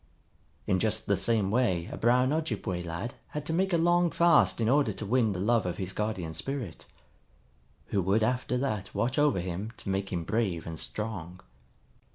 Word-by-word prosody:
In 95 - +2
just 110 +1 0
the 100 - +2
same 100 0 +1
way 100 -8 +1
a - - -4
brown 125 +4 +3
Ojibway 155 - -2
lad 85 +8 -5
had 150 -1 -5
to 160 - -2
make 190 +3 +1
a 170 - +3
long 175 +1 +3
fast 170 -5 +4
in 115 - +1
order 140 +3 +3
to 110 - -5
win 115 0 +2
the 90 - -3
love 110 0 +2
of 90 - -3
his 95 0 -4
Guardian 100 -7 -2
Spirit, 120 - -5 1.0
who 100 - +1
would 100 +5 +2
after 125 +2 0
that 110 -7 -3
watch 125 +4 0
over 145 -9 +3
him 90 +5 -4
to - - -6
make 95 0 -1
him 85 -3 -2
brave 100 -3 -1
and 80 -1 -5
strong. 95 -5 -4
110 Hz, 190 wpm, -29 LUFS, 95-130 Hz, 1.0 s, fast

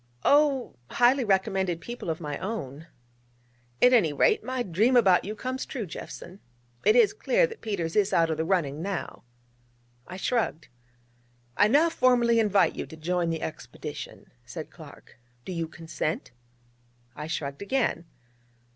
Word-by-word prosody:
'Oh, 280 - +3
highly 250 +2 +3
recommended 190 -4 +1
people 235 +1 -7
of 160 - -2
my 150 -3 -5
own.' 160 - -5 1.0
'At 250 - +7
any 200 -11 +4
rate, 145 - +2
my 255 +1 -2
dream 215 +7 +2
about 195 -7 +5
you 210 +2 -4
comes 255 +4 -4
true, 240 -6 -5
Jeffson. 180 +2 -9 0.4
It 435 - +5
is 460 -5 +5
clear - - +2
that 460 -2 -9
Peters 175 -7 -3
is 205 -2 +3
out 165 -1 +3
of 155 - -2
the 160 - 0
running 160 -5 0
now.' 195 0 -4 0.9
I 185 - -7
shrugged. 210 -6 -1 0.9
'I 205 - +5
now 300 +9 +4
formally 245 -5 +3
invite 200 -6 +3
you - - -5
to 160 - -11
join 175 +2 -1
the 165 -1 -3
expedition,' 160 - -8
said - - -8
Clark: - - -15 0.3
'do - - -5
you 165 -2 -2
consent?' 160 -3 -4 0.8
I 150 +1 -6
shrugged 140 -3 -4
again. 200 -6 0
195 Hz, 150 wpm, -27 LUFS, 165-245 Hz, 1.0 s, At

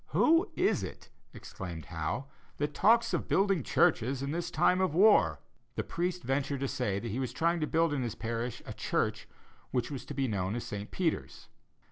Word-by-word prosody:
"Who 330 +6 +4
is 370 +3 +2
it," - - -8 0.2
exclaimed 85 -4 -8
Howe, 80 - -3 0.3
"that 145 +1 -1
talks 230 +6 +4
of - - -1
building 195 -3 +2
churches 130 +1 +2
in 140 - -2
this 170 +2 -2
time 180 +2 +3
of 185 -5 +1
war?" 205 +4 +5 0.3
The - - -1
priest 180 +1 -2
ventured 135 +1 -1
to 135 - 0
say 100 -6 -1
that 115 +2 -4
he 120 - -2
was 130 -3 -2
trying 170 +6 +1
to 155 - 0
build 165 -1 +2
in 140 - -1
his 120 -3 -3
parish 115 +1 -4
a - - -6
church - - -1 0.4
which 125 +3 -1
was 135 - -5
to - - -7
be 135 -1 0
known 100 -2 -1
as 120 - -3
St. 105 0 -6
Peter's. 170 -4 -2
140 Hz, 195 wpm, -31 LUFS, 115-180 Hz, 0.4 s, war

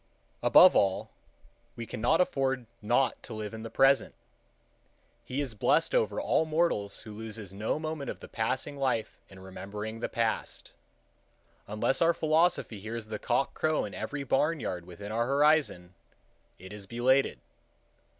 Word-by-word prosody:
Above - - +7
all, 95 -1 +1 0.6
we 115 - -6
cannot 120 +9 +1
afford 135 -7 0 0.2
not 120 +5 +1
to - - -8
live 110 0 -5
in 110 - -7
the 115 - -6
present. 135 +3 +3 1.1
He 135 +3 -3
is 135 -5 -4
blessed 105 - +2
over - - +1
all - - +2
mortals 155 -11 0
who 110 - -10
loses 110 -2 -7
no 105 +7 -1
moment 155 -2 -4
of - - -6
the - - -10
passing 130 +5 -2
life 130 -5 -1
in 95 - -14
remembering 105 +4 -7
the - - -3
past. 115 -1 -2 1.0
Unless 105 +5 0
our 170 0 +4
philosophy 155 - +1
hears 110 +2 -5
the 105 -1 -4
cock 125 +3 0
crow 155 -1 0
in 100 - -8
every 140 +6 -4
barn 150 +4 +1
yard 90 -7 -4
within 100 +4 -8
our 115 +2 0
horizon, 140 - +2 0.6
it 95 +2 -11
is 100 -2 -8
belated. 130 +4 +2
115 Hz, 150 wpm, -29 LUFS, 105-140 Hz, 1.1 s, Above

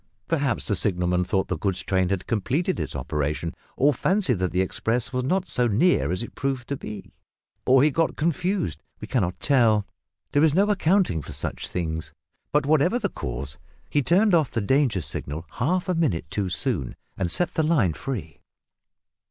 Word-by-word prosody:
Perhaps 145 -7 0
the 105 - +1
signalman 90 -2 +1
thought 95 +1 0
the - - -3
goods 95 -2 -1
train 95 -2 +1
had 95 -2 -1
completed 140 - 0
its - - -4
operation, 75 +3 -2 0.2
or 145 +3 +4
fancied 165 - +1
that 90 -1 0
the 90 - +1
express 115 +6 -1
was 125 0 0
not 185 +7 0
so 125 -1 +2
near 120 - +3
as 90 +5 -1
it - - -9
proved 135 -2 -2
to 140 - -1
be, 105 -6 -8 0.6
or 130 +1 +6
he 150 - +4
got 165 +3 +1
confused 170 - -1 0.2
we - - -7
cannot 95 -9 -1
tell; 115 -7 +3 0.5
there 145 - +3
is 155 -2 +4
no 195 +2 +5
accounting 185 - +2
for - - -9
such - - -3
things, 80 -2 -3 0.4
but 150 -1 +2
whatever 155 - +3
the 205 -5 -1
cause, 65 - -4 0.3
he 145 - +3
turned 190 - +3
off 160 -6 +4
the 115 - -2
danger 125 -2 +2
signal 80 +1 -4
half 175 +10 +1
a 185 - +1
minute 150 - 0
too 100 -3 -1
soon, 65 -7 -2 0.2
and 90 -3 -1
set 175 - +1
the - - +1
line 150 - +2
free. 80 - -6
125 Hz, 185 wpm, -25 LUFS, -, 0.6 s, or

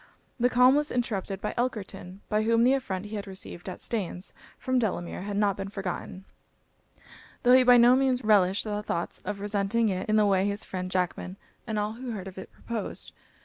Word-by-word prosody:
This 245 +1 +3
calm 250 +1 +6
was 295 0 +1
interrupted 200 -5 -2
by - - -2
Elkerton, 195 -5 -4
by 215 0 +1
whom 230 +1 +3
the 255 +2 +5
affront 200 -8 -2
he 210 +1 -5
had 200 - -6
received 190 -1 -7
at 185 - -7
Staines, 195 -4 -3 0.2
from 255 -1 0
Delamere, 180 -7 -2
had 205 -1 -3
not 205 -2 +2
been 195 0 -4
forgotten, 190 -1 -5 1.2
tho' 250 0 +6
he 260 - +8
by 250 -1 +7
no 240 +1 +7
means 260 -2 +1
relished 200 -3 +4
the 210 -1 -3
thoughts 170 -4 -3
of 205 +1 -3
resenting 205 +2 +1
it 185 +1 -3
in 215 - +3
the 215 -1 +5
way 195 -1 +3
his 205 +1 -2
friend 185 -1 -5
Jackman, 185 +1 -2 0.3
and 220 -2 -2
all 210 0 0
who 245 +1 -6
heard 195 -3 -6
of 190 0 -8
it, - - -10
proposed. 230 -3 -5
210 Hz, 200 wpm, -27 LUFS, 190-235 Hz, 1.2 s, he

